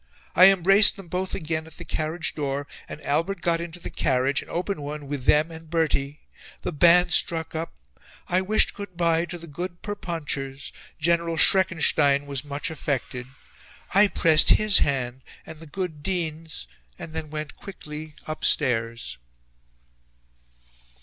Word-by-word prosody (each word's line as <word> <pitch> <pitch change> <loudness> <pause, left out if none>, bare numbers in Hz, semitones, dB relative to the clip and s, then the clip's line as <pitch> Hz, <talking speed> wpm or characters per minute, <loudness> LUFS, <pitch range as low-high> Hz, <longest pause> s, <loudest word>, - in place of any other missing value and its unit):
I 185 - +9
embraced 195 +2 +5
them 195 -4 -12
both 185 +2 -3
again 160 -2 -3
at 160 - -16
the - - -9
carriage 160 +2 -3
door, 140 -1 -3 0.2
and - - -8
Albert 165 +8 -1
got 170 -1 0
into 170 +1 -8
the - - -8
carriage, 130 +2 0
an - - -14
open 180 -1 -3
one, 145 0 -6
with 140 -2 -5
them 155 +2 +3
and 160 -1 -12
Bertie... 150 -3 -1 0.4
The - - -2
band 175 +2 +5
struck 160 -1 +1
up. 165 +1 -5 0.5
I 180 +1 +1
wished 210 +3 +2
good 200 -4 -9
bye 170 -1 +1
to 175 +1 -7
the 170 - -10
good 175 +3 -7
Perponchers. 145 -8 -5 0.3
General 170 +1 0
Schreckenstein 155 -6 +4
was 140 -1 -5
much 145 +1 -4
affected. 130 -5 -4 0.7
I 205 +2 +6
pressed 160 -5 +4
his 215 -1 +5
hand, 130 -2 -1 0.2
and 160 -1 -11
the 165 - -12
good 160 -1 -5
Dean's, 160 - -1 0.3
and 160 - -9
then 160 -1 -5
went 150 -1 -6
quickly 155 -5 -10
upstairs." 115 - -1
160 Hz, 150 wpm, -24 LUFS, 145-175 Hz, 0.7 s, I